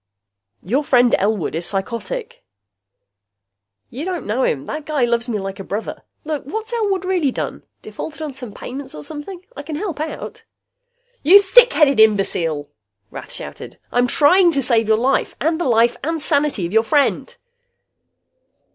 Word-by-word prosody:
"Your 260 +11 0
friend 245 -4 +3
Elwood 200 -3 0
is 170 +2 -3
psychotic." 330 - -5 1.5
"You 270 +5 -6
don't 360 -1 -4
know 225 +5 -1
him. 140 - 0
That 305 -1 -6
guy 295 -5 +1
loves 235 0 0
me 220 - -1
like 195 -1 -6
a - - -5
brother. 205 +3 -5 0.2
Look, 305 -3 -3
what's 440 - -5
Elwood 400 -5 0
really 360 -6 +1
done? - - -4 0.2
Defaulted 315 0 -7
on 300 -3 -5
some 250 -4 -8
payments 265 +6 -8
or 150 - -8
something? 345 - -8
I - - -6
can 300 +1 -6
help 340 -2 -4
out." 310 +1 -6 0.8
"You 365 +8 +8
thickheaded 380 - +5
imbecile!" 180 -8 +2 0.4
Rath - - -9
shouted. - - -8
"I'm 245 +1 +2
trying 345 +8 +5
to 275 -2 +1
save 230 -3 +2
your 220 0 +4
life, 260 +4 0
and 320 +3 0
the - - 0
life 235 -1 +3
and 325 +2 -1
sanity 290 - +1
of 170 - -5
your 225 - +5
friend!" 290 - 0
275 Hz, 160 wpm, -20 LUFS, 220-325 Hz, 1.5 s, You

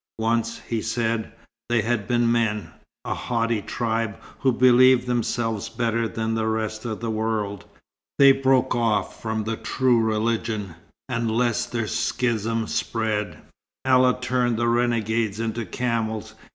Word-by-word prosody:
Once, 115 +1 0
he 115 -2 -1
said, 115 -1 -1 0.4
they 120 -2 +2
had 115 -2 -1
been 120 -1 +2
men 110 -3 0 0.3
a - - -1
haughty 115 -2 -1
tribe 115 0 -2 0.2
who 135 - +3
believed 125 0 +5
themselves 120 -3 -1
better 115 0 0
than 110 +1 -2
the 110 0 0
rest 110 0 -2
of 110 -2 -3
the 115 -1 -2
world. 110 -2 -2 0.5
They 140 -1 +8
broke 135 -1 +2
off 115 -4 0
from 110 -1 -2
the 110 +1 -3
true 130 -3 +2
religion, 110 -3 -1 0.3
and 120 -3 -1
lest 115 0 0
their 115 -2 -1
schism 115 -1 -1
spread, 110 -2 -2 0.4
Allah 130 -1 +4
turned 125 -2 0
the 120 +1 +1
renegades 115 -3 +1
into 115 0 -3
camels. 115 -4 -2
115 Hz, 140 wpm, -24 LUFS, 110-120 Hz, 0.5 s, They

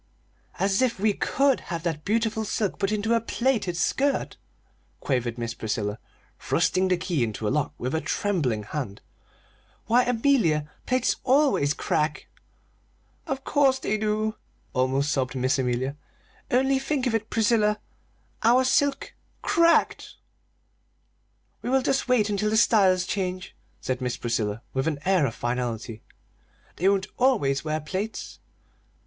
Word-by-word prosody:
"As 195 +3 +1
if 250 -6 +1
we 210 +1 +2
could 275 +5 +1
have 170 -2 -3
that 160 -3 -2
beautiful 220 +1 0
silk 210 -1 -2
put 195 0 0
into 215 +2 0
a 230 - +2
plaited 230 -6 0
skirt!" 275 +10 0 0.6
quavered 125 -3 -1
Miss 115 -1 -3
Priscilla, 105 -1 -3 0.4
thrusting 185 +3 +1
the 180 -1 +2
key 170 -6 -1
into 110 -1 -3
the - - +1
lock 145 0 -1
with 125 +2 -3
a 160 - 0
trembling 145 - -1
hand. 105 -3 -5 0.8
"Why, 240 +3 +4
Amelia, 225 - +2 0.2
plaits 255 0 +1
always 260 - +3
crack!" 150 0 -1 1.0
"Of 270 0 -3
course 275 -3 +3
they 215 -4 -2
do!" 215 0 0 0.4
almost 135 +3 +1
sobbed 130 0 -1
Miss 130 +1 +1
Amelia. 130 +2 -1 0.5
"Only 265 +2 +2
think 270 -1 -1
of 245 - 0
it, 225 -1 -1
Priscilla, 215 -2 +2 0.6
our 245 +3 +5
silk 280 +2 +1 0.3
cracked!" 335 0 +2 1.5
"We - - -4
will 265 0 +2
just 270 0 0
wait 245 -5 +3
until 210 0 0
the 220 - +1
styles 190 -5 +4
change," 185 -1 -3 0.2
said 130 0 -3
Miss 125 -1 -2
Priscilla, 110 -2 -2
with 130 +3 -1
an 155 -3 0
air 185 -6 +3
of 115 - -6
finality. 120 -2 -3 0.8
"They 185 +4 +3
won't 195 -1 +1
always 205 - +2
wear 155 0 -1
plaits!" 190 +8 -5
190 Hz, 140 wpm, -25 LUFS, -, 1.5 s, our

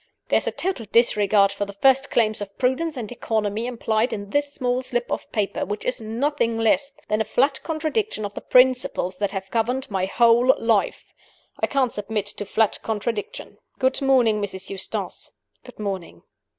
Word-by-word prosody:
There's - - +2
a - - +1
total 350 - -3
disregard 205 -3 +4
of 205 - -1
the 200 - -8
first 265 +6 +3
claims 215 -2 +1
of 200 -1 -7
prudence 270 +4 0
and 230 -3 -5
economy 220 -1 -2
implied 230 -1 0
in 200 -1 -5
this 290 0 +1
small 250 -2 -1
slip 245 -1 -2
of - - -4
paper 210 -3 -1
which 205 +2 -4
is 250 -1 -1
nothing 230 +1 -1
less 275 +5 +2
than 215 +1 +1
a - - +3
flat 265 +4 +1
contradiction 320 - -2
of 200 - -6
the - - -7
principles 250 -7 +3
that 205 -1 0
have 195 -1 -6
governed 250 +3 -1
my 190 -1 0
whole 235 +4 +5
life. 225 -3 0 0.5
I - - +1
can't 265 -4 +1
submit 210 0 -2
to 205 0 -5
flat 220 +1 +1
contradiction. 215 -1 -4 0.2
Good 260 +1 +1
morning, 245 -6 +3
Mrs. 190 -2 -5
Eustace 195 -1 -5 0.3
good 250 - -14
morning." 195 -4 -5
225 Hz, 175 wpm, -23 LUFS, 205-260 Hz, 0.5 s, whole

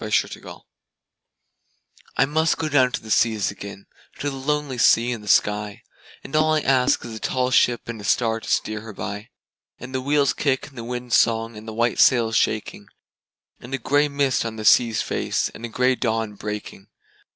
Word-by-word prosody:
Y - - -4
Z 105 - -5
Sea - - +3
Fever - - -11 1.6
I 135 - +5
MUST 160 +3 +1
down 130 -3 +4
to - - -4
the 110 - -8
seas 110 -4 +2
again, 100 0 -10 0.3
to 145 - -3
the - - -7
lonely 140 -1 -2
sea 115 +1 +4
and 115 -3 -5
the - - -12
sky, 105 0 +1 0.4
And 135 - -7
all 155 0 +3
I 155 - +1
ask 130 -2 +2
is 115 - -7
a 110 - -7
tall 130 +2 -1
ship 120 -1 +2
and 115 -2 -6
a - - -11
star 115 +1 +1
to - - -9
steer 110 -1 -1
her 110 0 -10
by, 105 +2 -6 0.5
And 130 +1 -9
the 130 - -1
wheel's 140 0 +2
kick 135 -3 -1
and 135 - -22
the 120 - -7
wind's 120 0 -2
song 115 0 +1
and 110 +1 -11
the 110 - -6
white 115 +1 0
sail's 115 -3 +4
shaking, 105 -1 -1 0.7
And 125 +3 -5
a - - -2
gray 145 +4 +2
mist 140 -2 0
on 115 -1 -5
the 110 -1 -6
sea's 115 0 +4
face, - - -1
and - - -13
a - - -4
gray 125 +3 +2
dawn 115 -3 -2
breaking. 105 -1 -7
120 Hz, 205 wpm, -23 LUFS, 110-130 Hz, 1.6 s, I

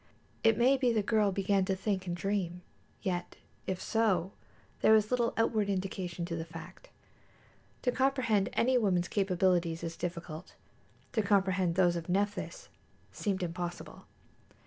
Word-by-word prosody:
It 225 -1 +5
may 260 +3 +4
be 255 -2 +2
the 220 -2 +1
girl 210 -1 +2
began 195 0 +1
to 190 - 0
think 190 -1 -2
and 175 0 -2
to - - -10
dream; 180 -3 -1 0.4
yet 180 -2 -2 0.3
if 185 -1 -2
so, 195 -6 +1 0.5
there 220 - +5
was 215 0 +4
little 240 -2 +2
outward 220 -2 +1
indication 185 -2 -3
of 165 -1 -3
the - - -2
fact. 165 - -11 0.9
To 250 - +2
comprehend 250 -6 +2
any 255 +1 +3
woman's 180 -5 +1
capabilities 180 -4 +1
is 165 -1 -4
difficult; 170 -1 -6 0.6
to 220 - +1
comprehend 190 -4 +2
those 175 -2 +4
of 170 0 -5
Nephthys 205 - -2 0.4
seemed 195 -3 -2
impossible. 175 0 -5
195 Hz, 145 wpm, -31 LUFS, 175-220 Hz, 0.9 s, It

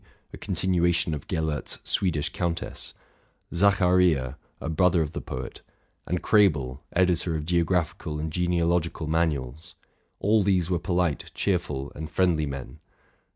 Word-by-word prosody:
'' - - -39
a - - -7
continuation 85 -2 +1
of 75 - -6
Gellert's 80 -4 -2
'* - - -35
Swedish 80 -6 +1
Countess; 85 -1 -3 0.6
Zacharia, 90 -8 +3 0.2
a - - -5
brother 85 +1 +3
of 75 - -5
the - - -5
poet; - - -6 0.5
and 90 0 -2
Krebel, 75 - +3
editor 90 -2 +2
of 75 -1 -3
geo 85 +1 +2
oraphical 80 -3 -1
and 80 +1 -3
genealogical 85 -1 0
manuals, 80 -1 -1 0.2
— - - -44
all 105 +2 +3
these 95 -3 +1
were 90 - +2
polite, 90 -3 -1
cheerful, 75 -8 -1
and 80 +1 -6
friendly 85 -5 +2
men. 70 -2 -7
85 Hz, 145 wpm, -26 LUFS, 75-90 Hz, 0.6 s, Zacharia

